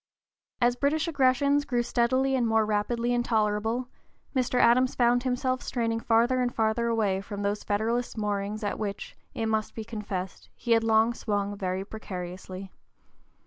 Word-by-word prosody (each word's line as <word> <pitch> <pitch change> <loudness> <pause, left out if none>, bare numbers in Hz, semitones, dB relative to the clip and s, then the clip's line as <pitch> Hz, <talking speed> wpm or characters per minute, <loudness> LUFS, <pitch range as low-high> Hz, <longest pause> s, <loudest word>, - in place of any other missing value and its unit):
As 240 0 +3
British 295 +5 0
aggressions 280 -1 +3
grew 245 -3 0
steadily 255 +3 +1
and 240 -3 +1
rapidly 220 +2 +1
more 245 - +2
intolerable, 225 +1 0 0.5
Mr. 250 -1 +1
Adams 255 +2 +4
found 245 0 +3
himself 255 0 -1
straining 230 -2 -1
farther 235 +3 +2
and 245 -1 0
farther 225 +1 0
away 210 -5 +1
from 205 +1 -6
those 205 +1 -1
Federalist 230 +4 -1
moorings 210 0 -2
at 205 - -2
which, 200 -2 -5 0.2
it 225 - -1
must 220 -1 -1
be 225 - -4
confessed, 205 -4 -6
he 235 - -4
had 225 -1 +5
long 225 +1 +3
swung 205 -3 -2
very 190 -1 -3
precariously. 185 -2 -7
225 Hz, 150 wpm, -27 LUFS, 210-245 Hz, 0.5 s, had